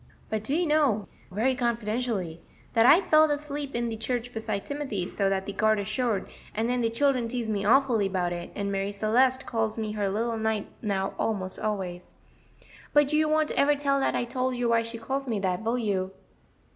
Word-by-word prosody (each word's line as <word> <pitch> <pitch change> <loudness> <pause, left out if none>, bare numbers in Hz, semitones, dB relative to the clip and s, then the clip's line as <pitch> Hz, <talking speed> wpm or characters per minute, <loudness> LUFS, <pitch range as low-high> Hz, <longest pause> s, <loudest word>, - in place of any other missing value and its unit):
But 215 -1 -1
do 270 +7 0
you 350 +2 +2
know," 285 - +2 0.2
very 225 +8 +1
confidentially, 230 - -2 0.3
"dat 230 +1 +5
I 320 +8 +8
felled 310 -4 +5
asleep 290 -2 -3
in 235 0 0
de 225 - -3
church 245 +2 -3
beside 215 -3 -3
Timothy, 265 -11 -3
so 195 0 0
dat 190 0 -1
de 200 - -5
garter 215 -1 +2
showed, 215 -1 0 0.3
and 220 +2 0
den 250 0 +1
de 230 - +2
children 255 0 +1
teased 230 -2 -2
me 200 -2 -1
awfully 230 -4 +4
'bout 180 -2 -1
it, 175 0 -6
and 200 -1 -2
Marie 195 0 -1
Celeste 250 +6 +2
calls 225 -2 -1
me 215 -1 -2
her 205 -2 -1
little 225 +3 -1
knight 220 -2 -1
now 195 -3 -1
almost 190 -4 -2
always. 190 -4 -4 0.8
But 295 0 +4
you 305 0 +3
won't 310 0 +2
ever 290 +1 +3
tell 280 -1 +1
dat 270 - +1
I 240 - 0
told 255 +1 -1
you 240 -1 0
why 230 0 +4
she 230 0 -6
calls 270 +4 -3
me 225 -4 -1
dat, 185 -1 -1
will 230 +2 0
you?" 195 -5 -1
225 Hz, 200 wpm, -27 LUFS, 205-260 Hz, 0.8 s, I